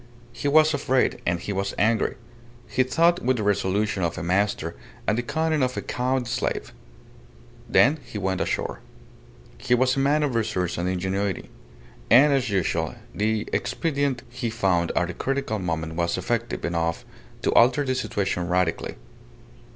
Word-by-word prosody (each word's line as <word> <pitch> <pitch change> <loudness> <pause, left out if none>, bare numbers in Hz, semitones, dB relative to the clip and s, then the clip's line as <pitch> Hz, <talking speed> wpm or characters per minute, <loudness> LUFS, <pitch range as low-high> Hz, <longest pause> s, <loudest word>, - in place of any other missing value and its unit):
He 145 - -3
was 155 +2 +5
afraid, 135 -2 +1
and 85 0 +1
he 100 - -4
was 100 0 -2
angry. 110 +1 +2 0.5
He 115 +4 +1
thought 165 +7 +3
with 130 0 +2
the 110 - -2
resolution 100 0 0
of 85 -2 -1
a - - -4
master 90 -2 0 0.3
and 105 - +2
the 120 - 0
cunning 160 +4 0
of 125 0 0
a - - -1
cowed 125 0 -1
slave. 120 - -2 1.0
Then 150 +5 +4
he - - -8
went 95 -2 -1
ashore. - - -2 0.8
He 125 - +2
was 130 +1 +2
a - - 0
man 145 +3 +3
of 140 -4 0
resource 100 -7 -1
and 90 +1 0
ingenuity; 95 +1 -2 0.6
and, 140 +5 +7
as 130 -4 +1
usual, 85 -5 0 0.2
the 110 +2 0
expedient 140 -6 -1
he 120 -1 -3
found 95 -7 +1
at 90 0 +1
a - - -9
critical 135 -1 -2
moment 80 -3 -3
was 85 +1 0
effective 120 -1 -2
enough 85 -1 -1 0.4
to - - +2
alter 130 +4 +5
the 130 - 0
situation 100 -8 -1
radically. 90 -1 0
110 Hz, 160 wpm, -25 LUFS, 90-130 Hz, 1.0 s, and